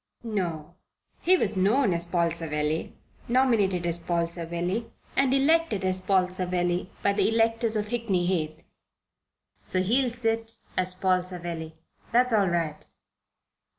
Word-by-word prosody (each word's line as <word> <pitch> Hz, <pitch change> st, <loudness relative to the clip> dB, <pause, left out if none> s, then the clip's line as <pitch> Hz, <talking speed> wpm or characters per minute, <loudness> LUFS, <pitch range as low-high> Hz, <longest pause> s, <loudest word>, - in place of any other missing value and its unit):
"No. 175 Hz, -8 st, -3 dB, 0.5 s
He 370 Hz, +2 st, +5 dB
was 215 Hz, -, 0 dB
known 205 Hz, +3 st, +3 dB
as 170 Hz, 0 st, -1 dB
Paul 170 Hz, -1 st, +1 dB
Savelli, 155 Hz, -1 st, -2 dB, 0.3 s
nominated 225 Hz, -8 st, +2 dB
as 170 Hz, 0 st, -1 dB
Paul 170 Hz, 0 st, 0 dB
Savelli, 170 Hz, +6 st, -3 dB, 0.3 s
and 270 Hz, -1 st, +3 dB
elected 275 Hz, -7 st, +2 dB
as 185 Hz, 0 st, 0 dB
Paul 185 Hz, -1 st, +3 dB
Savelli 180 Hz, -1 st, -1 dB
by 200 Hz, -, +3 dB
the 205 Hz, -, +2 dB
electors 225 Hz, 0 st, +1 dB
of 210 Hz, -1 st, -1 dB
Hickney 215 Hz, -7 st, 0 dB
Heath. 160 Hz, -4 st, -1 dB, 1.0 s
So 185 Hz, 0 st, +1 dB
he'll 250 Hz, +6 st, +2 dB
sit 225 Hz, -1 st, -2 dB, 0.2 s
as 185 Hz, 0 st, 0 dB
Paul 185 Hz, -1 st, +2 dB
Savelli. 170 Hz, -3 st, -6 dB, 0.4 s
That's 245 Hz, +1 st, +3 dB
all 205 Hz, -3 st, +4 dB
right. 165 Hz, -3 st, -1 dB
185 Hz, 135 wpm, -27 LUFS, 170-225 Hz, 1.0 s, He